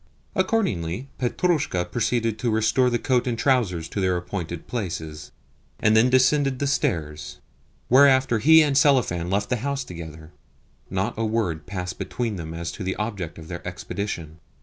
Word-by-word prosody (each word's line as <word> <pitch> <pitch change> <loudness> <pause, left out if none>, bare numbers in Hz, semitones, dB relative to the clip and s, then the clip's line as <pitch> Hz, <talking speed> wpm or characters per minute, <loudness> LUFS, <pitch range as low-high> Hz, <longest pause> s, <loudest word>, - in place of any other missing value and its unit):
Accordingly 135 - -1
Petrushka 135 - 0
proceeded 115 -1 0
to 120 - 0
restore 110 +3 +2
the 120 - +1
coat 125 -1 +1
and 120 -2 -1
trousers 115 - +1
to 100 - -3
their 90 -1 +2
appointed 85 -2 -5
places, 80 -9 -5 0.5
and 110 0 +3
then 115 +3 +5
descended 130 +1 +3
the 140 - -1
stairs; 85 - -2 0.5
whereafter 130 -2 +5
he 160 +6 +7
and 145 -2 0
Selifan 125 - +3
left 100 +2 0
the 125 - +2
house 140 +3 -2
together. 80 -4 -9 0.6
Not 95 +5 -1
a - - +1
word 105 -9 -1
passed 90 -2 -5
between 105 +3 -3
them 80 -2 -6
as 85 0 -4
to 105 - -7
the 95 +1 -2
object 100 -6 -4
of 80 -1 -10
their 85 0 -6
expedition. 85 -6 -5
110 Hz, 160 wpm, -24 LUFS, 85-130 Hz, 0.6 s, he